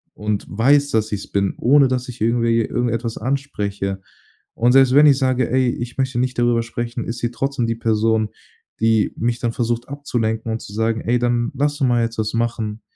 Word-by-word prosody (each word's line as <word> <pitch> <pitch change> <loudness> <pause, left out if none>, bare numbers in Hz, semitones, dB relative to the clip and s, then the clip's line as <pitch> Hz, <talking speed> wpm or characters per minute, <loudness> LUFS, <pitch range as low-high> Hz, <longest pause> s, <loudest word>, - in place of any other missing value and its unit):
und 105 -1 -2
weiß, 140 +7 +3
dass 110 -1 0
ich 100 - -3
es - - -26
bin, 100 -1 0
ohne 140 +2 +5
dass 125 -1 -2
ich 125 -2 -9
irgendwie 115 0 +2
irgendetwas 115 0 -2
anspreche. 105 -7 -3 0.6
Und 120 +2 +3
selbst 135 -1 +5
wenn 150 +1 +7
ich 140 -2 +5
sage: 130 -3 +1
„Ey, 130 -1 +2
ich 120 0 -5
möchte 130 -2 -1
nicht 125 0 -1
darüber 120 -1 +2
sprechen“, 120 +1 -4
ist 115 +1 -4
sie 120 -1 -2
trotzdem 135 +1 -2
die 115 - -1
Person, 110 -1 +1 0.5
die 110 -1 +2
mich 120 +1 -1
dann 115 -1 -2
versucht 120 +1 -2
abzulenken 115 -6 -2
und 110 - -3
zu - - -10
sagen: 110 +1 0
„Ey, 120 +2 +1
dann 120 -1 0
lass 145 +2 0
doch 135 - +1
mal 120 -1 +2
jetzt 115 0 -3
was 110 -1 -1
machen. 115 -2 -2
120 Hz, 205 wpm, -20 LUFS, 110-125 Hz, 0.6 s, wenn